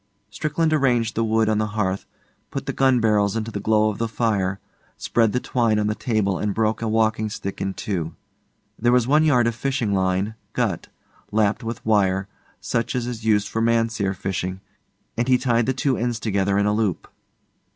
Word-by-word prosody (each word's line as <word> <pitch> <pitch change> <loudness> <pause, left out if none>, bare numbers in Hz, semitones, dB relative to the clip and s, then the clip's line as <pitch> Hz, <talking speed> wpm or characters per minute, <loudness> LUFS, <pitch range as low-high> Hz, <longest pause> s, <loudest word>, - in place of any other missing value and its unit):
Strickland 155 +8 0
arranged 120 -6 +2
the 115 - 0
wood 110 0 +2
on 110 -1 +2
the 110 - 0
hearth, 95 -2 -1 0.4
put - - -5
the - - -3
gun 130 -2 +3
barrels 105 -2 +2
into 115 0 -3
the 105 - -4
glow 110 0 +2
of 100 - -9
the 115 - 0
fire, 100 -4 0 0.4
spread 115 -2 +1
the 125 - 0
twine 115 -4 +1
on 105 - +1
the 105 - +1
table 105 -5 0
and 105 -1 -1
broke 110 0 0
a 115 - -1
walking 110 0 +1
stick 100 -2 -6
in 95 0 -2
two. 85 -6 -3 0.6
There 120 +2 +3
was 125 -1 +3
one 150 +3 +4
yard 125 -7 +4
of 115 - +1
fishing 125 -3 -1
line, 95 +2 0 0.2
gut, 110 -9 -1 0.4
lapped 110 0 +1
with 115 0 -5
wire, 95 -3 +2 0.3
such 115 0 -2
as 125 -2 -1
is 120 -2 -6
used 105 -2 +3
for 115 +2 -2
mahseer 115 -4 +1
fishing, 95 0 -3 0.5
and 120 +1 -1
he 130 -1 +5
tied 120 -2 +1
the - - +3
two 130 0 0
ends 120 -1 -1
together 100 -2 0
in 100 - +2
a 105 - +2
loop. 105 -5 -1
110 Hz, 195 wpm, -23 LUFS, 100-120 Hz, 0.6 s, he